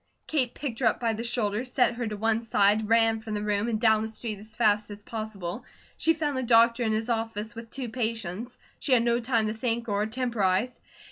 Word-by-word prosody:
Kate 260 Hz, -6 st, 0 dB
picked 255 Hz, -6 st, -4 dB
her 245 Hz, -, +3 dB
up 220 Hz, -, +1 dB
by 230 Hz, -2 st, 0 dB
the 225 Hz, +1 st, -4 dB
shoulders, 235 Hz, 0 st, -1 dB
set 250 Hz, -2 st, +3 dB
her 235 Hz, -1 st, -3 dB
to 210 Hz, -1 st, -4 dB
one 225 Hz, +1 st, +1 dB
side, 210 Hz, -1 st, +2 dB
ran 225 Hz, -1 st, +4 dB
from 220 Hz, -1 st, -5 dB
the 210 Hz, -, -2 dB
room 210 Hz, +1 st, 0 dB
and 225 Hz, -2 st, -1 dB
down 220 Hz, -2 st, +4 dB
the 220 Hz, -, -2 dB
street 220 Hz, -1 st, -5 dB
as 215 Hz, +2 st, -12 dB
fast 210 Hz, -2 st, +2 dB
as 205 Hz, 0 st, -9 dB
possible. 215 Hz, -6 st, -5 dB, 0.3 s
She 325 Hz, 0 st, +2 dB
found 300 Hz, -3 st, -1 dB
the 260 Hz, -, -1 dB
doctor 235 Hz, 0 st, +4 dB
in 225 Hz, -2 st, +1 dB
his 220 Hz, +1 st, -1 dB
office 225 Hz, -1 st, -2 dB
with 230 Hz, 0 st, -9 dB
two 260 Hz, 0 st, -5 dB
patients. 225 Hz, -1 st, -3 dB, 0.2 s
She 275 Hz, -, +1 dB
had 235 Hz, -2 st, +5 dB
no 235 Hz, 0 st, +2 dB
time 230 Hz, -2 st, +1 dB
to 215 Hz, -, -1 dB
think 230 Hz, +1 st, -2 dB
or 205 Hz, -1 st, 0 dB
temporize. 225 Hz, -2 st, 0 dB
225 Hz, 225 wpm, -27 LUFS, 215-240 Hz, 0.3 s, had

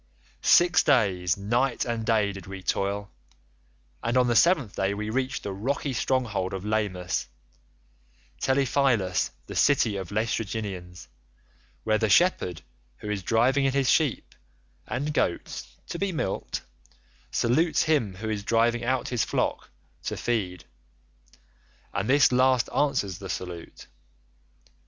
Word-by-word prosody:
Six 175 Hz, 0 st, +5 dB
days, 95 Hz, -, +2 dB
night 120 Hz, +6 st, 0 dB
and 115 Hz, -2 st, -2 dB
day 110 Hz, -2 st, +2 dB
did 95 Hz, -2 st, -10 dB
we 95 Hz, -1 st, -8 dB
toil, 100 Hz, +2 st, -1 dB, 0.9 s
and 120 Hz, +2 st, 0 dB
on 125 Hz, -, +5 dB
the 120 Hz, -1 st, +1 dB
seventh 150 Hz, -, +3 dB
day 95 Hz, +1 st, 0 dB
we 105 Hz, +1 st, -4 dB
reached 130 Hz, +2 st, -2 dB
the 100 Hz, -, -4 dB
rocky 135 Hz, +7 st, -2 dB
stronghold 115 Hz, -7 st, -1 dB
of 95 Hz, +1 st, -6 dB
Lamus—Telepylus, 100 Hz, -, -2 dB, 0.2 s
the -, -, -8 dB
city 120 Hz, -8 st, +3 dB
of 95 Hz, -3 st, -5 dB
the 105 Hz, -, -8 dB
Laestrygonians, 100 Hz, -, -3 dB, 0.8 s
where 110 Hz, -1 st, +2 dB
the 110 Hz, -1 st, +1 dB
shepherd 95 Hz, -, +2 dB, 0.3 s
who 105 Hz, -, -5 dB
is 100 Hz, -2 st, -2 dB
driving 120 Hz, +8 st, +2 dB
in 135 Hz, -, +1 dB
his 135 Hz, -3 st, +2 dB
sheep 150 Hz, -7 st, +1 dB, 0.5 s
and 145 Hz, +4 st, -2 dB
goats 85 Hz, -, -2 dB, 0.2 s
[to 170 Hz, -, -4 dB
be 200 Hz, -1 st, 0 dB
milked] 145 Hz, -, -3 dB, 0.7 s
salutes 155 Hz, +8 st, +2 dB
him 140 Hz, -, +1 dB
who 110 Hz, +4 st, -6 dB
is 105 Hz, -2 st, -3 dB
driving 115 Hz, +2 st, +2 dB
out 130 Hz, 0 st, 0 dB
his 125 Hz, -2 st, 0 dB
flock -, -, -2 dB, 0.4 s
[to -, -, -3 dB
feed] 95 Hz, -8 st, -2 dB, 1.3 s
and 100 Hz, -, -2 dB
this 140 Hz, 0 st, +5 dB
last 130 Hz, -1 st, +3 dB
answers 130 Hz, -, 0 dB
the 95 Hz, -1 st, -8 dB
salute. 90 Hz, -2 st, -6 dB
110 Hz, 135 wpm, -26 LUFS, 95-130 Hz, 1.3 s, Six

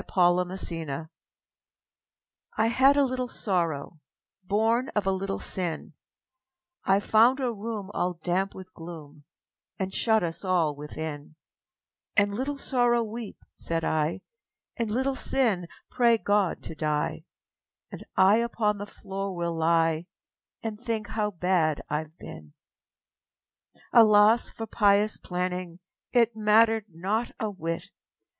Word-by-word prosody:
The 180 Hz, -1 st, +2 dB
Penitent 165 Hz, -5 st, -4 dB, 1.5 s
I 220 Hz, -, +3 dB
had 265 Hz, +4 st, +5 dB
a 285 Hz, -, +5 dB
little 255 Hz, -1 st, -2 dB
Sorrow, 170 Hz, -9 st, -2 dB, 0.4 s
Born 225 Hz, +6 st, +1 dB
of 210 Hz, -2 st, +1 dB
a 195 Hz, -, +2 dB
little 195 Hz, +1 st, -2 dB
Sin, 175 Hz, -2 st, -3 dB, 0.9 s
I 195 Hz, +1 st, +3 dB
found 230 Hz, +6 st, +4 dB
a 250 Hz, -3 st, -1 dB
room 210 Hz, -2 st, -5 dB
all 180 Hz, 0 st, -1 dB
damp 185 Hz, +2 st, 0 dB
with 185 Hz, -1 st, -11 dB
gloom 155 Hz, -3 st, -10 dB, 0.5 s
And 190 Hz, 0 st, -3 dB
shut 220 Hz, -3 st, +3 dB
us 165 Hz, +2 st, -4 dB
all 175 Hz, -6 st, +1 dB
within; 150 Hz, +1 st, -7 dB, 0.8 s
And, 205 Hz, 0 st, +4 dB
âLittle 265 Hz, +7 st, -3 dB
Sorrow, 245 Hz, -3 st, +2 dB
weep,â 225 Hz, 0 st, -8 dB
said 165 Hz, -1 st, -2 dB
I, 155 Hz, +4 st, 0 dB, 0.6 s
âAnd, 230 Hz, -2 st, 0 dB
Little 260 Hz, +5 st, 0 dB
Sin, 230 Hz, -9 st, 0 dB, 0.2 s
pray 235 Hz, -2 st, +4 dB
God 205 Hz, -4 st, 0 dB
to -, -, -7 dB
die, 150 Hz, -1 st, -2 dB, 0.7 s
And -, -, -8 dB
I 190 Hz, +3 st, +6 dB
upon 225 Hz, -3 st, 0 dB
the 205 Hz, -, -5 dB
floor 195 Hz, -1 st, -5 dB
will 170 Hz, -1 st, -2 dB
lie 165 Hz, 0 st, +2 dB, 0.6 s
And 220 Hz, -1 st, -5 dB
think 225 Hz, -3 st, -3 dB
how 210 Hz, -1 st, -1 dB
bad 175 Hz, -5 st, 0 dB
Iâve 155 Hz, +2 st, -3 dB
been!â 75 Hz, -, -17 dB
Alas 215 Hz, 0 st, +6 dB
for 225 Hz, -, -6 dB
pious 210 Hz, -1 st, +3 dB
planning 180 Hz, -1 st, -4 dB, 0.3 s
It 235 Hz, -2 st, +3 dB
mattered 220 Hz, 0 st, +4 dB
not 195 Hz, +8 st, -2 dB
a 215 Hz, -1 st, -2 dB
whit! 165 Hz, -3 st, -5 dB
195 Hz, 125 wpm, -27 LUFS, 170-225 Hz, 1.5 s, I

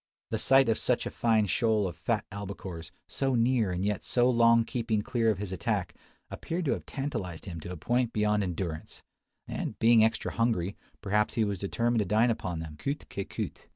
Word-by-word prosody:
The 110 Hz, -, 0 dB
sight 135 Hz, +3 st, +5 dB
of 115 Hz, -, +2 dB
such 125 Hz, -, +1 dB
a -, -, -3 dB
fine 110 Hz, -2 st, +2 dB
shoal 110 Hz, -1 st, +2 dB
of 85 Hz, -, -6 dB
fat 105 Hz, +7 st, -1 dB
albacores, 100 Hz, -4 st, -7 dB, 0.2 s
so 135 Hz, -2 st, 0 dB
near 115 Hz, -3 st, +2 dB
and 90 Hz, +2 st, -2 dB
yet 105 Hz, -1 st, -1 dB
so 120 Hz, 0 st, +2 dB
long 115 Hz, -2 st, +5 dB
keeping 115 Hz, -4 st, -1 dB
clear 115 Hz, -1 st, +1 dB
of 105 Hz, -, +1 dB
his 100 Hz, -1 st, -5 dB
attack, 95 Hz, -, -1 dB, 0.4 s
appeared 170 Hz, +1 st, -3 dB
to 135 Hz, -, +1 dB
have -, -, -3 dB
tantalised 115 Hz, -, -4 dB
him 85 Hz, -4 st, -6 dB
to 85 Hz, -, -7 dB
a 90 Hz, -, -6 dB
point 120 Hz, +7 st, 0 dB
beyond 105 Hz, -1 st, +1 dB
endurance; 85 Hz, -4 st, -4 dB, 0.4 s
and, -, -, -4 dB
being 115 Hz, -1 st, +6 dB
extra 110 Hz, -, 0 dB
hungry, 105 Hz, -5 st, 0 dB, 0.3 s
perhaps 105 Hz, +1 st, +1 dB
he 115 Hz, -, +2 dB
was 100 Hz, -3 st, -2 dB
determined 115 Hz, +4 st, 0 dB
to 105 Hz, -, +1 dB
dine 110 Hz, +5 st, +3 dB
upon 90 Hz, -6 st, -3 dB
them, 75 Hz, -2 st, -8 dB
coute 140 Hz, -, -4 dB
qui 100 Hz, -, -3 dB
coute. -, -, -6 dB
110 Hz, 200 wpm, -29 LUFS, 95-120 Hz, 0.4 s, being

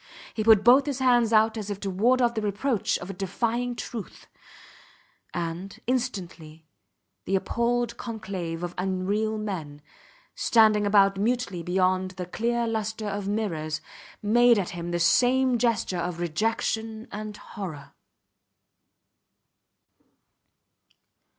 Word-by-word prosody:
He 215 Hz, -, -2 dB
put 215 Hz, -2 st, +6 dB
both 260 Hz, +5 st, +6 dB
his 280 Hz, -3 st, -1 dB
hands 245 Hz, -3 st, +3 dB
out 220 Hz, 0 st, +4 dB
as 210 Hz, -2 st, -5 dB
if 200 Hz, -1 st, -4 dB
to 195 Hz, -, -2 dB
ward 245 Hz, +7 st, +3 dB
off 235 Hz, -1 st, +2 dB
the 220 Hz, -, -2 dB
reproach 210 Hz, +2 st, 0 dB
of 180 Hz, +3 st, -7 dB
a -, -, -8 dB
defiling 230 Hz, +6 st, -2 dB
truth; 230 Hz, -3 st, -7 dB, 1.1 s
and, 175 Hz, +3 st, -5 dB
instantly, 180 Hz, -11 st, -3 dB, 0.6 s
the 195 Hz, -, 0 dB
appalled 235 Hz, +4 st, 0 dB
conclave 190 Hz, -7 st, -5 dB
of 175 Hz, 0 st, -4 dB
unreal 195 Hz, +4 st, -1 dB
men, 170 Hz, -9 st, -5 dB, 0.5 s
standing 215 Hz, -2 st, +4 dB
about 195 Hz, -1 st, +4 dB
mutely 225 Hz, -4 st, -1 dB
beyond 185 Hz, +1 st, +1 dB
the 180 Hz, -, -4 dB
clear 235 Hz, +6 st, -1 dB
lustre 220 Hz, -1 st, -3 dB
of 200 Hz, -1 st, -4 dB
mirrors, 165 Hz, -8 st, -2 dB, 0.4 s
made 240 Hz, +2 st, +5 dB
at 190 Hz, -3 st, -1 dB
him 175 Hz, -1 st, -5 dB
the 175 Hz, 0 st, -1 dB
same 250 Hz, +7 st, +3 dB
gesture 225 Hz, -6 st, 0 dB
of 175 Hz, 0 st, -3 dB
rejection 220 Hz, +5 st, -2 dB
and 210 Hz, 0 st, -6 dB
horror. 160 Hz, -10 st, -8 dB
210 Hz, 125 wpm, -26 LUFS, 185-235 Hz, 1.1 s, put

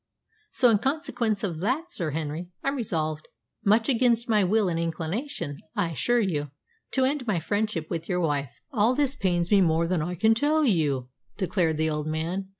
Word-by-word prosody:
So, 250 Hz, -, +4 dB
in 210 Hz, -, +3 dB
consequence 240 Hz, -, -1 dB
of 170 Hz, -6 st, -2 dB
that, 270 Hz, -, -1 dB
Sir 170 Hz, -, -1 dB
Henry, 155 Hz, +3 st, -4 dB
I'm 275 Hz, +1 st, 0 dB
resolved, 155 Hz, -, -2 dB, 0.4 s
much 220 Hz, +2 st, +3 dB
against 240 Hz, -2 st, +2 dB
my 215 Hz, -3 st, +3 dB
will 205 Hz, +2 st, +2 dB
and 165 Hz, -2 st, -1 dB
inclination, 165 Hz, -, -3 dB, 0.2 s
I 185 Hz, -5 st, 0 dB
assure 240 Hz, -, +1 dB
you, 155 Hz, -9 st, -1 dB, 0.4 s
to 260 Hz, -1 st, +3 dB
end 270 Hz, -2 st, -1 dB
my 205 Hz, -5 st, +1 dB
friendship 205 Hz, -2 st, -1 dB
with 165 Hz, -1 st, -4 dB
your 180 Hz, -1 st, +1 dB
wife." 145 Hz, -5 st, -1 dB
"All 235 Hz, 0 st, +2 dB
this 280 Hz, -1 st, +2 dB
pains 175 Hz, -6 st, 0 dB
me 200 Hz, -2 st, +6 dB
more 165 Hz, -1 st, +3 dB
than 170 Hz, -1 st, 0 dB
I 175 Hz, +3 st, -3 dB
can 220 Hz, +6 st, +4 dB
tell 300 Hz, +6 st, +2 dB
you," 145 Hz, -, +1 dB, 0.3 s
declared 175 Hz, -5 st, 0 dB
the 160 Hz, 0 st, +1 dB
old 150 Hz, 0 st, -3 dB
man. 170 Hz, +5 st, -3 dB
185 Hz, 185 wpm, -26 LUFS, 160-230 Hz, 0.4 s, me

